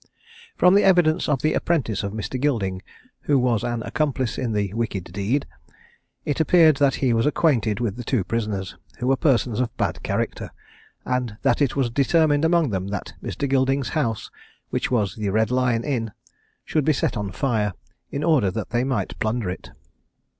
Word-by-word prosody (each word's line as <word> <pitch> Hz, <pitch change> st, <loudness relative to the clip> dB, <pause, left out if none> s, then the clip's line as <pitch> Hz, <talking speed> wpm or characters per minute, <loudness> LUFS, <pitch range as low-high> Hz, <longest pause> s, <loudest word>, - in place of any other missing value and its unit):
From 180 Hz, -, +5 dB
the 205 Hz, -, +5 dB
evidence 175 Hz, -5 st, +3 dB
of 140 Hz, -4 st, 0 dB
the 155 Hz, -, +2 dB
apprentice 135 Hz, -, 0 dB
of 100 Hz, -, -3 dB
Mr. 110 Hz, +4 st, -4 dB
Gilding, 100 Hz, -10 st, 0 dB, 0.4 s
who 145 Hz, -, +1 dB
was 125 Hz, -4 st, +1 dB
an 120 Hz, -1 st, -2 dB
accomplice 135 Hz, -5 st, -1 dB
in 120 Hz, -4 st, -2 dB
the 100 Hz, -2 st, -1 dB
wicked 110 Hz, -5 st, -2 dB
deed, 105 Hz, +8 st, 0 dB, 0.8 s
it 145 Hz, -, -1 dB
appeared 160 Hz, -2 st, +5 dB
that 140 Hz, -1 st, +3 dB
he 125 Hz, -, +3 dB
was 115 Hz, +3 st, +2 dB
acquainted 120 Hz, -10 st, +1 dB
with 115 Hz, -3 st, -2 dB
the 120 Hz, -, -5 dB
two 120 Hz, -3 st, 0 dB
prisoners, 105 Hz, -3 st, -3 dB, 0.2 s
who 125 Hz, -, -4 dB
were 135 Hz, +1 st, +3 dB
persons 125 Hz, -6 st, +1 dB
of 125 Hz, -2 st, -2 dB
bad -, -, -1 dB
character; -, -, -2 dB, 0.6 s
and 125 Hz, -4 st, -2 dB
that -, -, +2 dB
it 140 Hz, -4 st, +2 dB
was 130 Hz, -4 st, 0 dB
determined 145 Hz, +3 st, +3 dB
among 165 Hz, -5 st, +3 dB
them 95 Hz, -1 st, -2 dB
that 100 Hz, +1 st, -5 dB
Mr. 140 Hz, -, -3 dB
Gilding's 135 Hz, -1 st, +1 dB
house, 115 Hz, -9 st, -2 dB, 0.4 s
which -, -, -1 dB
was 105 Hz, -6 st, 0 dB
the 105 Hz, -2 st, -2 dB
Red 110 Hz, +3 st, +1 dB
Lion 125 Hz, -2 st, +1 dB
Inn, 115 Hz, -7 st, -2 dB, 0.5 s
should 155 Hz, -, 0 dB
be 155 Hz, +2 st, +3 dB
set 130 Hz, -, -1 dB
on 105 Hz, -3 st, -3 dB
fire, 105 Hz, -2 st, 0 dB, 0.4 s
in 140 Hz, -, -3 dB
order 150 Hz, -, +3 dB
that 105 Hz, +3 st, -5 dB
they 120 Hz, +1 st, +1 dB
might 130 Hz, -8 st, -2 dB
plunder 110 Hz, -3 st, -1 dB
it. 90 Hz, -, -8 dB
125 Hz, 180 wpm, -23 LUFS, 105-145 Hz, 0.8 s, From